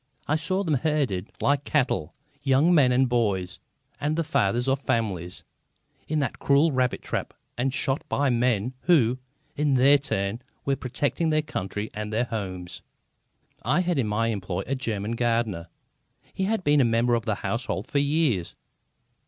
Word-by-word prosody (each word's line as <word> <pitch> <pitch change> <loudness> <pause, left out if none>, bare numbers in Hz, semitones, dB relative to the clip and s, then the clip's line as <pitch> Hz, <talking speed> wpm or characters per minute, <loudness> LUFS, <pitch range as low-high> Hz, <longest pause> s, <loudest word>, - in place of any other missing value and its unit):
I 150 - +2
saw 185 +5 0
them 160 -5 0
herded 135 - -1
like 140 0 +2
cattle, 130 - 0 0.3
young 140 +5 +3
men 140 -6 +5
and 130 +1 +3
boys 100 -7 0 0.4
and 150 +1 0
the 165 - 0
fathers 120 -5 +1
of 135 +1 +2
families, 95 -9 -2 0.6
in 155 - -1
that 130 - -3
cruel 145 +3 +3
rabbit 130 -2 0
trap - - -4 0.2
and 130 +2 0
shot 135 +1 +1
by 140 -2 +1
men 120 -1 +1
who, 130 -8 +4 0.4
in 145 -2 +2
their 140 +3 +6
turn, 100 -4 -2 0.2
were 140 - +2
protecting 135 +5 -1
their 155 -1 +2
country 105 -7 -4
and 105 0 -5
their 115 +3 +1
homes. 95 -6 -5 0.8
I 150 - +2
have 175 -4 0
in 120 - +1
my 110 +2 0
employ 95 -3 -3
a 135 - -2
German 110 -5 -3
gardener. 115 -7 0 0.7
He 190 - -1
has 220 +1 0
been 145 -4 +4
a - - +5
member 120 +1 +2
of 115 -1 0
the 110 -3 0
household 120 +5 -3
for 145 - 0
years. 140 - +1
125 Hz, 165 wpm, -26 LUFS, 110-145 Hz, 0.8 s, their